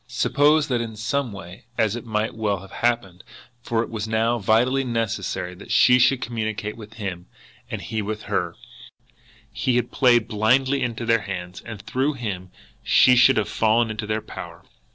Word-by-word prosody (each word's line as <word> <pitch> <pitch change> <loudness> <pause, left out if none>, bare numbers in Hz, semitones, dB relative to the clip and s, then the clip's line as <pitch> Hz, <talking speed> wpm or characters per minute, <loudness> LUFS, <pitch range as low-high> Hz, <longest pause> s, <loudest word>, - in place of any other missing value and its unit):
Suppose 145 +5 +3
that 120 -2 +1
in 115 -2 -5
some 125 +3 -2
way, 95 0 -10
as 110 -1 +1
it 120 0 -7
might 110 0 -1
well 105 -4 -1
have 95 - -13
happened, 115 -7 -1 0.4
for 115 -1 0
it - - -8
was 110 -1 -4
now 115 +2 +1
vitally 120 +6 +2
necessary 115 -6 -2
that 90 - -13
she 125 0 +6
should 130 +1 +3
communicate 110 -2 -3
with 110 -1 -11
him 95 -5 -5 0.4
and - - -4
he 110 0 -3
with 105 +1 -4
her, - - -2 1.0
he 120 +3 0
had 120 -1 0
played 120 -4 +4
blindly 130 +6 +2
into 120 -1 -2
their 115 0 +3
hands, 90 -2 -6
and 115 -3 -8
through 135 +4 0
him 100 -8 -5 0.3
she 125 - +5
should 125 +2 +6
have 110 - +1
fallen 110 +1 +2
into 110 -1 -5
their 110 0 -2
power! - - -9
115 Hz, 175 wpm, -23 LUFS, 105-120 Hz, 1.0 s, she